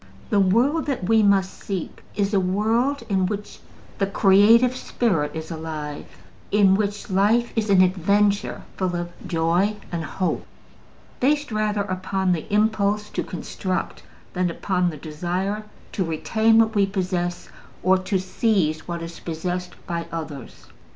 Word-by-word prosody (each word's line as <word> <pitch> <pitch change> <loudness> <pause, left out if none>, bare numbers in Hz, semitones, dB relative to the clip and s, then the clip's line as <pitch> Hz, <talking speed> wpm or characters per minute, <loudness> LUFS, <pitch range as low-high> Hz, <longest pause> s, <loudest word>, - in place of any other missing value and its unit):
The 205 - +4
world 240 - +2
that 270 -9 -2
we 225 0 +5
must 195 -2 +2
seek 190 -4 -5
is 200 0 0
a 200 - +4
world 225 +9 +1
in 190 -3 +1
which 205 +1 -5 0.4
the 195 - +2
creative 210 +6 +5
spirit 185 -13 -1
is 160 +1 -6
alive, 155 -2 -5 0.4
in 200 -2 +5
which 205 0 -1
life 215 +5 +2
is 220 -2 0
an 190 -2 +6
adventure 200 +3 +1
full 185 -2 -1
of 175 0 -3 0.2
joy 170 +5 +1 0.2
and 170 -2 -2
hope, 185 +3 -2 0.8
based 290 +1 +1
rather 215 -1 0
upon 190 -1 -1
the 175 +4 -2
impulse 210 -1 +1
to - - -2
construct 185 +1 -4 0.3
than 180 0 0
upon 180 +1 0
the 155 - -7
desire 180 +8 -3 0.3
to 190 - -1
retain 220 +7 +2
what 225 -1 +4
we 200 -2 +3
possess 180 -2 -2 0.3
or 185 +1 +4
to 190 +1 -1
seize 185 -4 0
what 170 -1 -4
is 165 0 -8
possessed 180 +2 -4
by 170 -1 -3
others. 155 -6 -7
195 Hz, 145 wpm, -23 LUFS, 175-210 Hz, 0.8 s, an